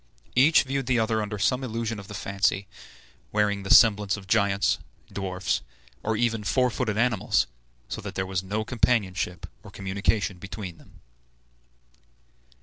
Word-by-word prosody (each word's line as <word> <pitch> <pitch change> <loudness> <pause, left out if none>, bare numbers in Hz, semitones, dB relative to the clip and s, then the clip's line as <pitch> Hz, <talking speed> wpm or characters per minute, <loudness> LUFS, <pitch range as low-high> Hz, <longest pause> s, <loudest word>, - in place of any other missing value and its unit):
Each 140 +6 +6
viewed 135 -1 -2
the 125 - +2
others 110 -1 +1
under 105 0 -4
some 125 +7 +1
illusion 115 -2 -3
of 100 - -10
the 105 - -8
fancy, 95 +1 0 0.6
wearing 105 -1 +1
the 100 - -7
semblance 105 -3 +6
of 100 - -10
giants, 100 -1 +2 0.3
dwarfs, 95 -1 -1 0.4
or 110 0 -1
even 115 -2 0
four 125 +4 +2
footed 110 -4 -2
animals, 115 -4 +2 0.4
so - - -5
that - - -7
there 95 - -1
was 95 -1 -2
no 105 +3 -3
companionship 100 -7 0 0.2
or - - -12
communication 100 0 -1
between 95 -2 -7
them. - - -19
105 Hz, 145 wpm, -26 LUFS, 95-115 Hz, 0.6 s, Each